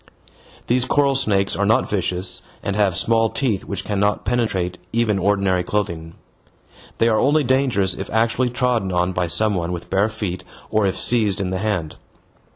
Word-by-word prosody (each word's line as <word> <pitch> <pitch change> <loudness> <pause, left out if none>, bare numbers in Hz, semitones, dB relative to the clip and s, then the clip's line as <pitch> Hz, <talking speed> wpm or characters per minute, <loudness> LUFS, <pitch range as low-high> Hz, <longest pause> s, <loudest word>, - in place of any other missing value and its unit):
These 125 +1 +2
coral 140 0 +2
snakes 100 -7 +2
are 100 - 0
not 115 +5 +2
vicious 90 -2 -2 0.2
and 100 - -2
have 100 -4 +2
small 115 +2 +2
teeth 115 -8 -2
which 100 -2 -4
cannot 105 0 0
penetrate 95 -7 -1
even 110 -3 +1
ordinary 95 -2 +1
clothing. 85 -5 -3 0.8
They 115 - +3
are 110 -2 +3
only 150 +2 +3
dangerous 125 -8 +1
if 95 +2 -6
actually 115 +3 +1
trodden 120 -6 0
on 90 +1 +1
by 90 -1 -1
some 105 +5 +1
one 85 -2 -2
with 90 -1 -6
bare 100 +3 +2
feet 100 -4 -5 0.3
or 110 -2 +2
if 95 - -2
seized 105 -5 +2
in 95 -2 -2
the 95 - -2
hand. 95 -7 -2
105 Hz, 170 wpm, -21 LUFS, 95-115 Hz, 0.8 s, They